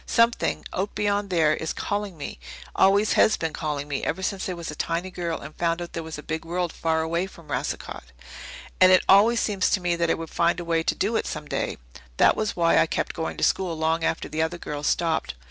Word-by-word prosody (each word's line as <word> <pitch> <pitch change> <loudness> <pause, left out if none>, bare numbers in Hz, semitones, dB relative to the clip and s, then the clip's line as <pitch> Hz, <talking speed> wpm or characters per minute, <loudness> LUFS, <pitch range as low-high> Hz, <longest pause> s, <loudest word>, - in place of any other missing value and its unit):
Something 230 0 +2
out 195 +3 -2
beyond 205 -1 0
there 160 -4 +3
is 160 - -3
calling 205 -3 -3
me, 145 - -7 0.4
always 200 +2 +4
has 215 - +4
been 160 -2 -3
calling 150 -2 -3
me 140 -2 -3
ever 190 +4 -2
since 190 0 -2
I - - -2
was 170 -3 -6
a - - -8
tiny 170 +4 -2
girl 170 -2 -3
and 145 +2 -9
found 170 0 0
out 175 0 -7
there 165 - -3
was 160 -1 -7
a 150 - -9
big 160 0 -4
world 175 +1 -2
far 160 -1 0
away 170 +3 -1
from 170 -5 -16
Racicot. - - -4 0.7
And 185 0 +7
it 185 - +6
always 220 +5 +6
seemed 200 -3 -2
to 185 - +3
me 175 -1 0
that 170 -1 0
I - - +3
would 165 -1 -7
find 170 +1 +1
a 175 - -5
way 165 -1 +1
to 205 +6 0
it - - -2
some 150 -1 -5
day. - - -2 0.4
That - - +5
was 215 -1 -2
why 170 -1 +4
I - - +4
kept - - -2
going 160 -1 -4
to - - -3
school 175 -4 +1
long 160 +1 0
after - - -1
the 155 - -2
other 160 +2 -1
girls 145 -3 -4
stopped. 160 - 0
170 Hz, 235 wpm, -25 LUFS, 160-190 Hz, 0.7 s, And